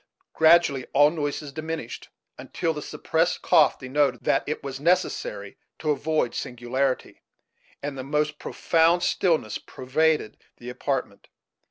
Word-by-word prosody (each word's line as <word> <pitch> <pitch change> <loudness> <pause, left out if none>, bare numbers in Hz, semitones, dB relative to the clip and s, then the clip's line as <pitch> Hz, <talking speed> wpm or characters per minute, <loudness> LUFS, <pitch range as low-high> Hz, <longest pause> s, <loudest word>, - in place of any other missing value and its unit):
Gradually 160 -5 +4
all 145 +2 +6
noises 145 -2 -4
diminished, 155 -5 -6 0.3
until 165 - -3
the 150 - -6
suppressed 165 +4 -1
cough 150 - +4
denoted 135 +1 0
that 135 - +2
it 150 - -4
was 135 -1 -6
necessary 180 - -1 0.2
to 155 - -1
avoid 150 -3 0
singularity, 125 +2 -3 0.6
and 145 -1 -4
the 130 - -6
most 150 +2 -1
profound 170 +1 +2
stillness 160 - +1
pervaded 150 0 -1 0.2
the 120 +1 -8
apartment. 130 -4 -3
150 Hz, 125 wpm, -25 LUFS, 130-160 Hz, 0.6 s, all